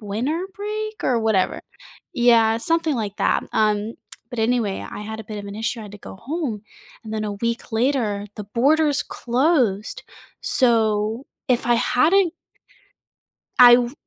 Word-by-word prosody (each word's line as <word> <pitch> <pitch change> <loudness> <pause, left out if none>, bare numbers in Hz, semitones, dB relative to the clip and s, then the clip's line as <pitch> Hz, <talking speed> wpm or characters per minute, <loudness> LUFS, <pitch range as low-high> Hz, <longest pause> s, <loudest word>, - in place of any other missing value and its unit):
winter 250 - -2
break 430 +1 -5
or 245 -2 +2
whatever. 220 -4 +1 0.5
Yeah, 230 -3 +4
something 325 +3 +2
like 210 -3 -4
that. - - +1
Um, 215 +1 +1 0.4
but 245 - -7
anyway, 220 -3 0
I - - -7
had 220 +1 -6
a - - -10
bit 210 +1 -7
of 205 - -7
an 200 - -7
issue. 225 +2 -2
I - - -8
had 205 - -11
to 205 - -10
go 190 - -11
home, 260 - -4 0.4
and 220 - -7
then 215 - -2
a 210 - -3
week 235 +5 -3
later, 220 -4 0
the 210 - -6
borders 290 +7 +2
closed. 245 - 0 0.4
So 225 0 +2 0.2
if 245 -2 +1
I 240 - +4
hadn't 335 +9 +2 1.2
I 245 -1 +10
w 245 0 -1
235 Hz, 160 wpm, -22 LUFS, 215-275 Hz, 1.2 s, I